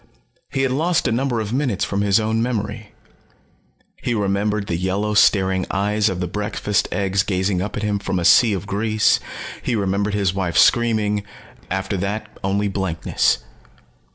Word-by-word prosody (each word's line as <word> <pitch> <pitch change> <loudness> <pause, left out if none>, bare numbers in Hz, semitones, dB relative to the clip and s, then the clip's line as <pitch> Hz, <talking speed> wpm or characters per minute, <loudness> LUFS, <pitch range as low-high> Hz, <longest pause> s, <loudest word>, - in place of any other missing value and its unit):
He 135 - -1
had 135 - +1
lost 165 +6 +1
a - - 0
number 120 0 0
of 110 0 -3
minutes 130 -7 0
from 100 0 -2
his 100 +1 +3
own 110 +1 0
memory. 110 -2 -3 1.1
He 120 - -1
remembered 100 0 0
the 85 - -2
yellow 95 +4 -1
staring 95 -2 +3
eyes 105 +2 +1
of 95 -2 -3
the 90 - -1
breakfast 105 +1 -1
eggs 100 -1 +1
gazing 95 -1 0
up 105 - -4
at 105 - -3
him 105 -1 0
from 95 - -2
a 85 - -1
sea 110 +5 +6
of 95 - -3
grease. 110 +2 +2 0.4
He 120 - -1
remembered 100 0 0
his 100 -3 +1
wife 95 -3 -2
screaming 110 -3 +3 0.5
after 95 +1 -2
that 105 +3 -4
only 100 +2 0
blankness. 95 -5 0
105 Hz, 165 wpm, -21 LUFS, 95-110 Hz, 1.1 s, sea